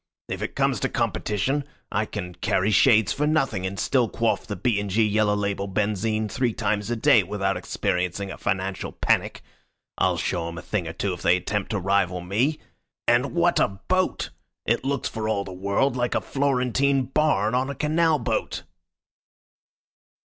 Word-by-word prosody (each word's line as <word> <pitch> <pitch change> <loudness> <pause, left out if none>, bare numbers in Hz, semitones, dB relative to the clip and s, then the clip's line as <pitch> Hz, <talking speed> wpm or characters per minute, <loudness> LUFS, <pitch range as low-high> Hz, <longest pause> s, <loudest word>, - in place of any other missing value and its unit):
If - - -4
it - - -4
comes - - +1
to - - -1
competition, 135 +8 -1 0.3
I 105 +1 0
can 90 -4 -5
carry 95 +4 0
shades 110 -4 +5
for 150 +1 0
nothing 135 -12 +1
and 100 +1 -6
still 125 -5 +2
quaff 115 +2 0
the 105 - -3
B. 100 +2 +1
& - - -4
G. 110 +3 +2
yellow 105 0 +2
label 100 -1 -2
benzine 105 +2 0
three 120 +3 0
times 105 0 -1
a 120 - 0
day 120 0 +5
without 95 0 -1
experiencing 90 +1 -2
a - - -7
financial 95 0 -2
panic. - - 0 0.6
I'll - - +2
show 85 -1 -1
'em 85 0 -7
a 80 - -7
thing 95 -4 -2
or 80 - -5
two 95 +2 -2
if 90 - -8
they 85 +2 +4
attempt 105 +3 -3
to 105 - -1
rival 95 -1 +1
me. 115 - 0 0.5
And 125 +6 +2
what 170 0 +3
a - - +4
boat! 180 - -1 0.3
It 120 +3 +1
looks 140 -1 -1
for 110 -1 -3
all 100 -2 0
the 95 - -8
world 100 +8 0
like 120 -1 0
a - - +1
Florentine 135 0 +1
barn 125 -6 +1
on 130 +2 +1
a 140 - -4
canal 155 +2 +2
boat." 120 - -2
105 Hz, 180 wpm, -25 LUFS, 95-130 Hz, 0.6 s, shades